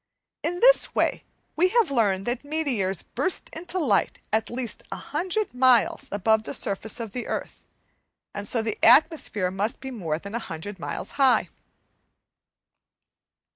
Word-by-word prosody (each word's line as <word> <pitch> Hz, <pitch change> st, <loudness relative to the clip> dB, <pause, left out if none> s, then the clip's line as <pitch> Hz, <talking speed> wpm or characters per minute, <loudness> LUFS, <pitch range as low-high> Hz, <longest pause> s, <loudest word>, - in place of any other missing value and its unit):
In 355 Hz, +2 st, -2 dB
this -, -, +5 dB
way -, -, 0 dB, 0.3 s
we 350 Hz, +4 st, +4 dB
have 445 Hz, -5 st, +2 dB
learnt 200 Hz, -7 st, +1 dB
that 240 Hz, +2 st, -2 dB
meteors 265 Hz, -, -1 dB
burst 375 Hz, -, -2 dB
into 355 Hz, +3 st, -4 dB
light 255 Hz, -, +1 dB
at 220 Hz, 0 st, +1 dB
least 240 Hz, -2 st, -3 dB
100 375 Hz, -, -2 dB
miles 250 Hz, -2 st, +3 dB
above 220 Hz, +2 st, +2 dB
the -, -, -3 dB
surface 205 Hz, +3 st, -3 dB
of 225 Hz, -3 st, -5 dB
the 245 Hz, +2 st, -5 dB
earth, -, -, -5 dB, 0.7 s
and 205 Hz, 0 st, -5 dB
so 230 Hz, 0 st, 0 dB
the 220 Hz, -1 st, -4 dB
atmosphere 245 Hz, -, +4 dB
must 205 Hz, +6 st, -2 dB
be 265 Hz, 0 st, -7 dB
more 170 Hz, -11 st, -3 dB
than 200 Hz, +4 st, -9 dB
100 205 Hz, -3 st, -6 dB
miles 145 Hz, -2 st, -5 dB
high. 260 Hz, -2 st, +4 dB
235 Hz, 140 wpm, -25 LUFS, 205-300 Hz, 0.7 s, this